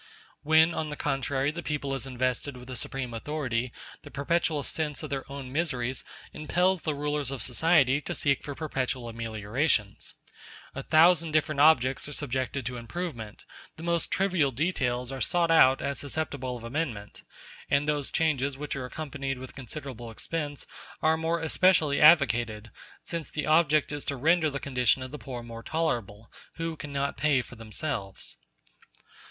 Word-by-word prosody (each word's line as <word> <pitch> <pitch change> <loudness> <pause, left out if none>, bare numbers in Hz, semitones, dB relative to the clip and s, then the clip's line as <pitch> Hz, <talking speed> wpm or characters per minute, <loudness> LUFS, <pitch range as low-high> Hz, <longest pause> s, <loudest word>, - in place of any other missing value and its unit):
When, 160 +2 +5
on 155 -1 -2
the 150 - -4
contrary, 135 0 0
the 170 +3 -6
people 145 -4 -2
is 135 0 -2
invested 130 +1 -1
with 125 0 -11
the 130 - -6
supreme 125 0 -4
authority, 125 -1 -2 0.3
the - - -11
perpetual 150 +1 0
sense 150 0 -2
of 155 - -6
their 135 0 -4
own 135 -2 -7
miseries 130 -5 -1 0.3
impels 180 +4 +1
the 155 -2 -1
rulers 145 -1 -1
of 135 -5 0
society 145 0 +3
to - - -3
seek 140 -2 +1
for 145 - -6
perpetual 130 -5 -2
ameliorations. 115 +1 -1 0.6
A 135 - -4
thousand 165 +2 +5
different 155 -2 +2
objects 140 -3 +4
are - - -5
subjected 135 -2 -2
to 125 +1 -3
improvement; 120 -3 -6 0.3
the 160 - -9
most 170 -1 +1
trivial 185 -7 +2
details 125 -3 -1
are 135 -1 -5
sought 170 -1 +2
out 135 -5 +6
as 140 -1 -2
susceptible 140 -4 -3
of 115 - -12
amendment; 115 -5 -4 0.5
and 140 +1 +2
those 145 -2 0
changes 140 -4 +1
which 150 +1 -4
are 130 -2 -4
accompanied 135 -1 -4
with 130 0 -9
considerable 130 -3 -7
expense 145 +5 -4 0.4
are 160 0 +5
more 165 +1 0
especially 160 -3 +3
advocated, 120 -9 +5 0.3
since 165 -2 -4
the 150 - -3
object 155 -1 +3
is 145 -1 -4
to 140 - -2
render 160 +4 +3
the 140 -1 -4
condition 130 -1 +1
of 130 - -7
the 150 - -7
poor 125 -3 -7
more 115 -1 -8
tolerable, 115 -9 -2 0.2
who 165 -1 -3
cannot 140 -1 -3
pay 150 -3 +3
for - - -13
themselves. 110 -2 -4
140 Hz, 160 wpm, -28 LUFS, 125-155 Hz, 0.6 s, out